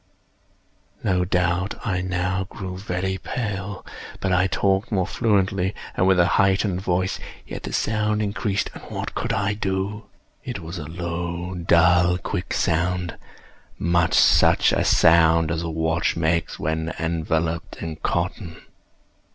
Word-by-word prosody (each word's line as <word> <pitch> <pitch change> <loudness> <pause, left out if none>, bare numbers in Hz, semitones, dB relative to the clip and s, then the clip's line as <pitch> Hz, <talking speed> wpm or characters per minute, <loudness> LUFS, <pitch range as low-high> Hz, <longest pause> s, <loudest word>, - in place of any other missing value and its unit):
No 90 -1 +1
doubt 90 +2 0
I 95 -5 0
now 90 +1 -1
grew 95 -2 -7
very 95 0 -3
pale;—but 100 -3 -5
I 90 +1 +3
talked 95 +4 0
more 95 -4 +1
fluently, 100 -3 +1 0.2
and 95 - +2
with 95 -1 +4
a 85 - +6 0.2
heightened 95 -1 +1
voice. 95 0 0 0.3
Yet - - -7
the - - -6
sound 105 0 0
increased—and 100 -1 -2
what - - -5
could - - -2
I 100 +1 0
do? 100 +1 -2 0.4
It 125 -3 -4
was 85 0 -7
a 75 - -6
low, 85 +1 -4
dull, 90 0 +4
quick 90 +1 -4
sound—much 85 0 -1
such - - +5
a - - +1
sound 80 -1 +5
as 85 -1 -1
a 85 - -3
watch 80 +1 0
makes 85 0 0
when 80 +1 -2
enveloped 80 0 -1
in 80 -1 -5
cotton. 85 +1 -2
90 Hz, 130 wpm, -23 LUFS, 85-95 Hz, 0.4 s, a